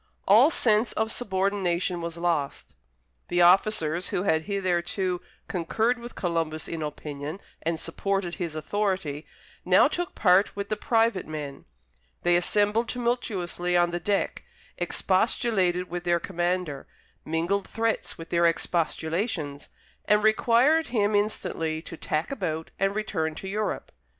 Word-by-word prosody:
All 225 +9 +7
sense 220 -6 +3
of 220 0 0
subordination 190 -5 0
was 170 0 -5
lost. 170 -5 -2 0.5
The 175 0 +3
officers, 175 -2 +3
who 180 - -1
had 160 -5 +1
hitherto 185 -2 -1 0.3
concurred 220 +8 0
with 240 +1 -9
Columbus 165 -3 -2
in 165 -1 -4
opinion, 150 +2 -5 0.2
and 165 0 -1
supported 195 -3 -2
his 165 -3 -3
authority, 165 -3 -2 0.4
now - - +5
took 350 +1 -3
part 185 +1 +4
with 200 0 -4
the 215 - 0
private 225 -2 +1
men; 150 -3 -6 0.6
they 175 0 +4
assembled 205 +6 +2
tumultuously 200 -8 -1
on 175 0 +3
the 175 - -2
deck, 200 +3 -1 0.3
expostulated 185 -7 +1
with 175 0 -5
their 175 -1 +2
commander, 175 -5 -2 0.4
mingled 170 +5 -1
threats 225 0 -1
with 165 - -10
their 170 0 +4
expostulations, 165 -2 -1 0.4
and 210 0 +3
required 240 +8 +4
him 210 -3 +1
instantly 165 -6 -1
to 165 - -8
tack 155 - -2
about 160 - -3
and 195 +1 +1
return 160 -7 -2
to 190 - -7
Europe. 210 +2 -3
180 Hz, 130 wpm, -26 LUFS, 165-210 Hz, 0.6 s, All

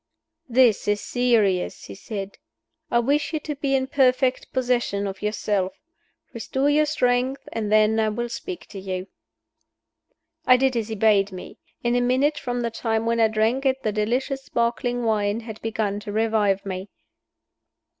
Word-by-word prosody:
"This 240 -4 +4
is 205 0 +2
serious," 220 -8 +1
he 100 - -9
said. 200 - -7 0.5
"I 235 - +2
wish 285 +6 +1
you 315 - 0
to 300 - -4
be 275 -1 0
in 260 -1 +1
perfect 260 -1 +2
possession 245 -6 0
of 195 -1 -5
yourself. 205 -3 -1 0.6
Restore 265 +5 0
your 305 +1 +3
strength 260 -3 0
and 215 -2 -2
then 215 +1 +4
I 220 -1 +2
will 240 +3 -3
speak 360 +9 -6
to 200 - -8
you." 185 -1 -4 1.4
I 255 - +7
did 265 0 +1
as 225 -3 -1
he 220 - -4
bade 205 -2 +3
me. 185 -1 -10 0.2
In 240 0 +1
a 245 - +2
minute 270 +5 +2
from 245 -1 -3
the 235 -1 -2
time 225 -1 -1
when 230 0 +1
I 225 - +5
drank 220 +5 +1
it 265 -1 0
the 215 - 0
delicious 250 +6 -1
sparkling 240 +1 -1
wine 215 -1 0
had 220 -2 -9
begun 215 -2 -2
to 205 0 -7
revive 215 -3 +1
me. 190 0 -5
230 Hz, 165 wpm, -24 LUFS, 210-255 Hz, 1.4 s, I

